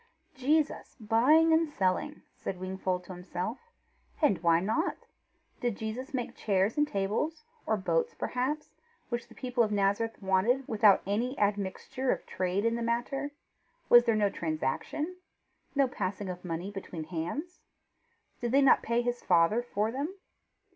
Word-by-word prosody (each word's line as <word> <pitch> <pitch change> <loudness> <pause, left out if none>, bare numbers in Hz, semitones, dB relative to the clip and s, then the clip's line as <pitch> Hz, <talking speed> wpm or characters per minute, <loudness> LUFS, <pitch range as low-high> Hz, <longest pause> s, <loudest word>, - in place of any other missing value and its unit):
"Jesus 295 +2 0
buying 265 +10 +5
and 320 0 +3
selling!" 185 -8 -1
said 185 - -5
Wingfold 185 -1 -2
to 185 - -9
himself. 180 +5 -4 0.6
"And 205 - +3
why 170 -1 +4
not? 220 - 0 0.6
Did 240 -4 -1
Jesus 235 +6 -5
make 255 -4 -3
chairs 200 0 +1
and 295 0 +2
tables, 220 - -1 0.2
or 220 - +2
boats 470 - 0
perhaps, 275 +5 -2 0.4
which 240 -1 -3
the - - -16
people 250 -2 -1
of 215 - -1
Nazareth 205 +3 +1
wanted, 205 +7 +2
without 210 -3 +5
any 235 +7 -1
admixture 205 +5 -1
of - - -2
trade 185 +3 -1
in 230 - +3
the 235 - -3
matter? 240 +5 -1 0.6
Was 240 0 +8
there 230 -2 +3
no 205 -2 +2
transaction? 165 - -2 0.6
No 275 -1 +4
passing 200 -4 -3
of 180 0 -6
money 175 +2 -4
between 185 -4 -6
hands? 185 - -4 0.8
Did 240 0 -2
they 280 - +6
not 270 - +6
pay 235 +1 0
his 245 0 -2
father 175 +6 +4
for 220 -2 -1
them? 290 +9 -3
225 Hz, 150 wpm, -30 LUFS, 190-265 Hz, 0.8 s, Was